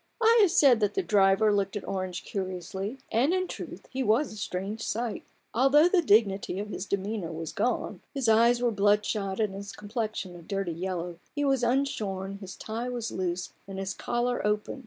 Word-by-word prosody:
I 460 0 +5
have 400 - +6
said 275 -9 +5
that 210 -2 0
the 390 - +1
driver 205 - +4
looked 200 -1 0
at 205 - -5
Orange 185 -2 -3
curiously; 190 +4 -4
and 265 +11 +3
in 370 0 0
truth - - -8
he 265 - -2
was 240 +4 +2
a - - -9
strange 200 +2 -4
sight. 230 0 -2 0.3
All 260 +4 +4
the 335 +6 +5
dignity 200 - +3
of 205 +1 -4
his 200 -1 -5
demeanour 200 -3 -2
was 160 0 -5
gone: 250 - -1
his 270 -5 -2
eyes 235 +2 +5
were 240 - +3
bloodshot, 205 -1 +1
and 210 -3 +1
his 200 +1 -7
complexion 210 -3 -4
a 175 - -10
dirty 195 0 -3
yellow: 175 0 -4 0.2
he 290 0 0
was 270 -2 +2
unshorn, 210 -7 -1
his 190 -2 -8
tie 230 +3 -4
was 240 -2 -3
loose, 180 -1 -3
and 195 -1 -7
his 195 0 -3
collar 245 +3 -1
open. 210 +5 -1
210 Hz, 190 wpm, -28 LUFS, 195-245 Hz, 0.3 s, have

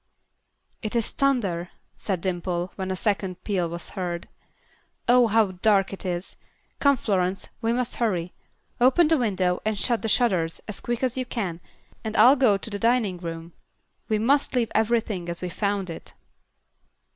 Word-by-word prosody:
"It 215 +1 -3
is 230 -2 0
thunder," 200 -11 0 0.3
said 190 -4 -3
Dimple, 175 -1 -2
when 190 -1 -4
a 190 - -1
second 190 -2 -1
peal 185 -5 0
was 170 +1 -6
heard. 175 -3 -4 0.8
"Oh, 245 0 +6
how 220 -2 +3
dark 195 +1 +2
it 195 - -5
is. 175 +1 -4 0.4
Come, 280 -1 +4
Florence; 190 -4 -1
we 225 -1 +1
must 245 0 -1
hurry. 180 -7 -1 0.5
Open 265 +7 +5
the 320 0 +4
window 185 -6 0
and 215 -1 -1
shut 235 +3 +1
the 225 - -2
shutters 185 -10 +1
as 215 - -5
quick 240 +1 -3
as 255 -1 0
you 255 - -1
can 180 -9 -3 0.4
and 220 -1 -3
I'll 245 +6 +8
go 250 -7 +4
to 195 - -4
the 205 - -3
dining 225 -5 +2
room. 165 -1 -7 0.6
We 215 - +2
must 270 +5 +2
leave 235 -3 +1
everything 220 -5 0
as 170 - -4
we 180 - -4
found 200 0 -1
it." - - -10
205 Hz, 170 wpm, -25 LUFS, 180-235 Hz, 0.8 s, I'll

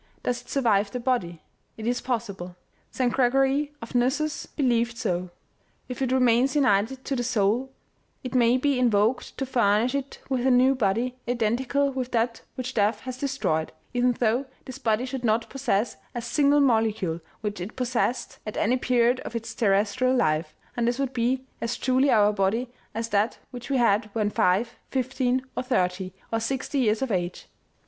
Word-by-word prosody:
Does 245 -1 -1
it - - -21
survive 215 -7 +2
the 250 - -4
body? 235 -10 -1 0.3
It 220 - -6
is 245 +1 0
possible. 200 -8 -4 0.3
St. 250 -2 0
Gregory 270 +3 +2
of 230 - -9
Nyssus 265 +5 0
believed 240 -4 0
so. 185 -7 -2 0.6
If 250 0 -6
it 260 -1 0
remains 255 +1 +3
united 255 -1 +2
to 275 - -1
the 245 - -1
soul, 235 +2 +1 0.5
it 255 - -5
may 245 -1 +4
be 275 0 +1
invoked 230 0 +1
to 270 - -1
furnish 235 -1 +2
it 280 -1 -3
with 260 -1 0
a - - +5
new 255 +1 +5
body 240 +2 0
identical 250 +4 +1
with 260 -2 -3
that 230 0 0
which 255 -1 -4
death 210 0 +1
has 255 -1 -6
destroyed, 260 - -1 0.2
even 245 0 +2
though 240 +3 +1 0.2
this 260 - -8
body 225 +2 +1
should 260 -1 -5
not 225 0 +1
possess 240 -5 0 0.2
a 240 - -2
single 285 +4 +3
molecule 220 -9 +1 0.2
which 210 -3 -4
it 190 +5 -6
possessed 250 0 -1
at 215 - -6
any 245 +4 +2
period 250 0 +2
of - - -7
its 230 0 -4
terrestrial 215 +4 +2
life, 155 -7 +1 0.2
and 235 -2 0
this 240 +1 +1
would 270 -1 -2
be 255 +2 0 0.2
as 235 +1 -2
truly 260 +2 +2
our 210 -3 +4
body 215 +5 0 0.2
as 230 0 -2
that 210 +2 +1
which 245 0 -8
we 275 - +2
had 215 -2 +2
when 210 -2 0
five, 210 +7 +1
fifteen, 260 0 0
or - - -1
thirty, 185 -7 0 0.2
or 225 - +2
sixty 265 +4 -2
years 225 0 +2
of 260 - -2
age. 175 -2 -2
245 Hz, 175 wpm, -26 LUFS, 215-260 Hz, 0.6 s, a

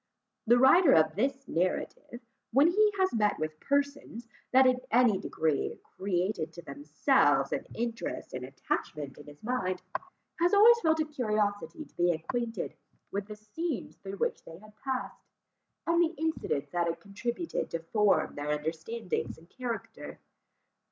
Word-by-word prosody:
The 240 +2 +6
writer 270 +6 +7
of 155 -1 +4
this 270 +5 -1
narrative, 185 +7 -2 0.3
when 275 +5 +5
he 420 +4 +4
has 380 0 +2
met 210 -3 +2
with 155 0 -4
persons, 280 -4 -1 0.2
that 260 +1 +6
in 255 0 +3
any 230 -4 +4
degree 155 -3 -1 0.2
created 185 -3 -1
to 170 - -10
themselves 290 +1 +2
an - - -3
interest 235 0 -4
and 130 - -4
attachment 140 +1 -4
in 150 - -13
his 145 +4 -14
mind, 185 -7 -1 0.6
has 350 +4 +4
always 465 +3 +8
felt 320 -4 +2
a - - +1
curiosity 215 +1 -1
to - - -25
be 175 0 +2
acquainted 230 +8 -3 0.4
with 200 0 -3
the 210 - -7
scenes 235 +8 -4
through 195 0 -7
which - - -1
they 165 - -11
had 215 +2 -17
passed, 265 0 -4 0.6
and 335 +1 +3
the 335 0 +1
incidents 315 - -2
that 175 -1 0
had 165 - -2
contributed 235 - -3
to - - -2
form 200 +5 +2
their 145 +1 -4
understandings 160 +8 -3
and 165 +2 -19
character. 245 -3 -6
220 Hz, 150 wpm, -30 LUFS, 175-275 Hz, 0.6 s, always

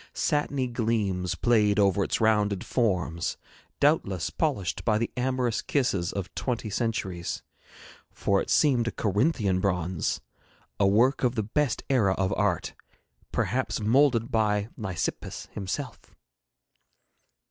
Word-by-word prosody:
Satiny 145 -3 0
gleams 110 -7 -1
played 105 -4 +3
over 100 -1 +3
its - - -1
rounded 105 -3 +2
forms, 90 -8 0 0.4
doubtless 100 - +1
polished 135 - -1
by 110 -2 +2
the 115 +1 -1
amorous 125 -2 0
kisses 100 - 0
of 95 -2 -5
twenty 120 -4 -3
centuries, 95 -6 -2 0.7
for 100 0 +1
it - - -6
seemed 125 -6 +3
a - - 0
Corinthian 105 - +1
bronze, 90 -3 -1 0.6
a 100 - +4
work 120 +8 +3
of 125 -1 +2
the 110 - 0
best 130 +4 0
era 110 -8 +3
of 95 +1 0
art, 100 -5 0 0.6
perhaps 125 +6 -1
moulded 120 +2 +3
by 105 -2 +1
Lysippus 95 -7 -4
himself. 105 +6 -4
110 Hz, 120 wpm, -27 LUFS, 95-125 Hz, 0.7 s, a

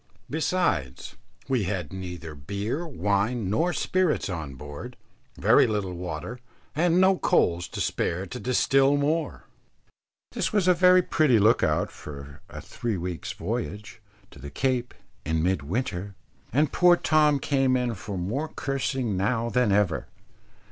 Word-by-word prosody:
Besides, 145 - -1 0.3
we 125 -6 +1
had 90 -5 -3
neither 90 -4 -7
beer, 100 - -4
wine, 105 - -1
nor 165 +11 +1
spirits 185 - 0
on 80 -7 -5
board, 75 +2 -9 0.4
very - - +5
little 105 -4 -2
water, 90 +6 -6 0.4
and 170 +3 +3
no 190 0 +4
coals 85 +1 +2
to - - -7
spare 90 +3 -1
to 125 +6 -7
distil 135 +3 +3
more. 150 +1 -1 0.9
This - - -1
was 205 -4 +1
a 180 - +7
very 180 +1 +5
pretty 150 -9 +3
look 110 +2 +4
out - - +1
for 70 -1 -10
a - - -8
three 115 -4 -4
weeks' 90 -1 -5
voyage, 105 +2 -5 0.3
to - - -14
the 70 +2 -8
Cape, 125 - -1 0.3
in 80 +1 -1
mid 90 -3 +1
winter. 95 - -3 0.4
And 145 +4 +2
poor 180 0 +6
Tom 150 -3 +3
came 135 -2 +1
in 125 -2 -1
for 100 -1 -6
more 115 - -2
cursing 135 -6 -2
now 115 +5 0
than 125 -4 +2
ever. 100 -7 +1
110 Hz, 145 wpm, -26 LUFS, 90-140 Hz, 0.9 s, a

